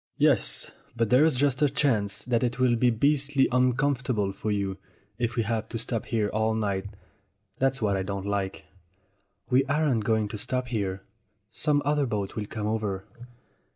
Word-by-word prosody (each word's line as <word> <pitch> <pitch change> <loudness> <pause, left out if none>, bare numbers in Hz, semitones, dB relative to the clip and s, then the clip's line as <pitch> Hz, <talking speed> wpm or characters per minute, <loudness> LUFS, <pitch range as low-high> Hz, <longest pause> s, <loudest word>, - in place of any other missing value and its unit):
"Yes, - - +2 0.2
but 115 -2 0
there's 145 +4 +5
just 140 +1 +1
a 145 - +5
chance 115 -8 +1
that 120 -1 +1
it 125 -1 -1
will 125 -2 +3
be 125 +1 +3
beastly 140 +3 +2
uncomfortable 125 -4 +1
for 100 +2 -4
you, 100 -2 -1 0.4
if 120 0 -1
we 115 - +1
have 110 0 -2
to 115 - -3
stop 115 -1 -3
here 110 -3 0
all 110 +1 0
night. 100 -3 -1 0.7
That's 135 -2 +1
what 100 -2 +2
I 95 - 0
don't 100 0 -4
like." 100 -1 -2 0.9
"We 130 +2 +5
aren't 140 -5 +1
going 110 0 +1
to 105 - -6
stop 125 +3 -2
here. 100 -5 -2 0.5
Some 145 +3 +1
other 145 -1 +2
boat 100 -3 -3
will 105 -2 -3
come 105 -1 -4
over." 105 -3 -2
115 Hz, 170 wpm, -27 LUFS, 105-130 Hz, 0.9 s, there's